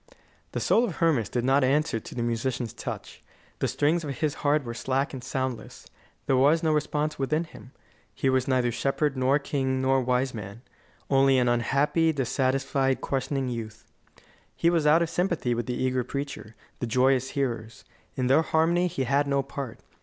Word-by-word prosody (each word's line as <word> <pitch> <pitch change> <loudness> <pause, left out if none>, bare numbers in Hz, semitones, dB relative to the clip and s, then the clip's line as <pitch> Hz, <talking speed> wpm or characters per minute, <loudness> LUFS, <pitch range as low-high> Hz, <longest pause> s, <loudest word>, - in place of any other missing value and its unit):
The - - -1
soul 235 - +3
of 200 -9 -2
Hermas 145 - +1
did 120 -1 -1
not 135 +1 +3
answer 140 -2 +1
to - - -11
the 120 - -2
musician's 120 0 -2
touch. - - -7 0.4
The - - +1
strings 160 +4 +1
of 140 -3 -5
his 155 -3 0
heart 145 0 +2
were 120 -2 -5
slack 135 +4 -1
and 130 -2 -7
soundless; 130 -2 -4 0.4
there 135 - +2
was 145 +6 +4
no 160 -1 +2
response 150 0 -1
within 150 +5 0
him. 145 -5 -14 0.4
He - - -2
was 130 -1 +2
neither 125 -2 +2
shepherd, 135 +4 0
nor 130 +2 +3
king, 135 -2 -1
nor 130 0 +2
wise 125 +1 0
man; 105 +1 -8 0.5
only 135 -1 +5
an 125 -1 +2
unhappy, 140 +7 +2
dissatisfied, 135 0 0
questioning 135 0 -2
youth. 115 -2 -6 0.7
He 170 - +2
was 165 -3 +2
out 160 +3 +5
of 165 - -3
sympathy 170 -9 0
with 120 +1 -3
the 125 - -2
eager 130 -1 0
preacher, 140 -4 -6 0.2
the 120 - -2
joyous 130 +2 +2
hearers. 115 -5 -3 0.3
In 130 - -1
their 135 +5 +4
harmony 165 +3 +2
he 140 -6 -2
had 140 +3 +1
no 140 -1 +1
part. 135 -3 -7
135 Hz, 180 wpm, -26 LUFS, 125-150 Hz, 0.7 s, only